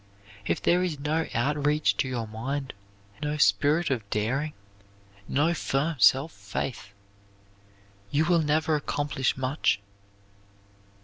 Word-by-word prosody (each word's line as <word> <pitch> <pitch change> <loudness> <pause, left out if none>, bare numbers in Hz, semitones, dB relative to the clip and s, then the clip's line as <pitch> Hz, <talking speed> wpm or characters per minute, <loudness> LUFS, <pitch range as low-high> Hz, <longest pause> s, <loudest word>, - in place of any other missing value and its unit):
If - - +1
there 175 +1 +4
is 170 -6 -2
no 155 +3 -1
out 145 +5 0
reach 150 +1 +2
to 135 - 0
your 120 -3 -3
mind, 130 +5 -4 0.5
no 150 0 -1
spirit 145 - +3
of 110 -6 -2
daring, 130 +10 -1 0.7
no 155 +5 +2
firm 150 0 -1
self 135 +9 +5
faith, 100 +2 -5 1.2
you 150 +7 +2
will 170 -1 +3
never 155 +1 +1
accomplish 145 -3 -1
much. 130 -5 +1
145 Hz, 120 wpm, -27 LUFS, 130-155 Hz, 1.2 s, self